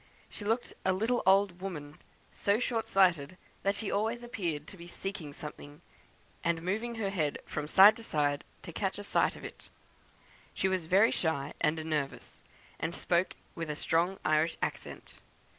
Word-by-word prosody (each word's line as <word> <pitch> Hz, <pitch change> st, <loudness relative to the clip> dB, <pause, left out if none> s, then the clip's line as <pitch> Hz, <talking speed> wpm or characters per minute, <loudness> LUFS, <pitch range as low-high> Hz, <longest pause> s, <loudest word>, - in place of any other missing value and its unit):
She 205 Hz, -, -7 dB
looked 225 Hz, +3 st, 0 dB
a 185 Hz, -, +3 dB
little 225 Hz, +6 st, +1 dB
old 190 Hz, -2 st, +4 dB
woman, 150 Hz, -6 st, -6 dB, 0.3 s
so 200 Hz, +1 st, +1 dB
short 230 Hz, -1 st, -1 dB
sighted 180 Hz, -4 st, +3 dB, 0.2 s
that 200 Hz, +1 st, +1 dB
she 210 Hz, 0 st, -3 dB
always 225 Hz, +4 st, 0 dB
appeared 170 Hz, -11 st, -3 dB
to 195 Hz, -, -11 dB
be 170 Hz, -2 st, -11 dB
seeking 180 Hz, -4 st, -5 dB
something, 145 Hz, +2 st, -9 dB, 0.6 s
and 170 Hz, -1 st, 0 dB
moving 220 Hz, +6 st, -1 dB
her 205 Hz, -3 st, -1 dB
head 155 Hz, -7 st, 0 dB
from 150 Hz, -, -4 dB
side 200 Hz, +6 st, +8 dB
to 230 Hz, -, -9 dB
side 145 Hz, -7 st, 0 dB, 0.2 s
to -, -, -7 dB
catch -, -, -2 dB
a -, -, -6 dB
sight -, -, +2 dB
of -, -, -9 dB
it. -, -, -9 dB, 0.9 s
She 190 Hz, -, +1 dB
was 185 Hz, -3 st, 0 dB
very 195 Hz, +7 st, +5 dB
shy 150 Hz, -4 st, -1 dB
and 155 Hz, 0 st, +1 dB
nervous, 150 Hz, -3 st, -3 dB, 0.4 s
and 170 Hz, -, -2 dB
spoke 175 Hz, +1 st, +1 dB, 0.2 s
with 165 Hz, -2 st, -5 dB
a 150 Hz, -, -2 dB
strong 170 Hz, +5 st, +1 dB
Irish 155 Hz, +2 st, +2 dB
accent. -, -, -5 dB
180 Hz, 170 wpm, -31 LUFS, 155-200 Hz, 0.9 s, side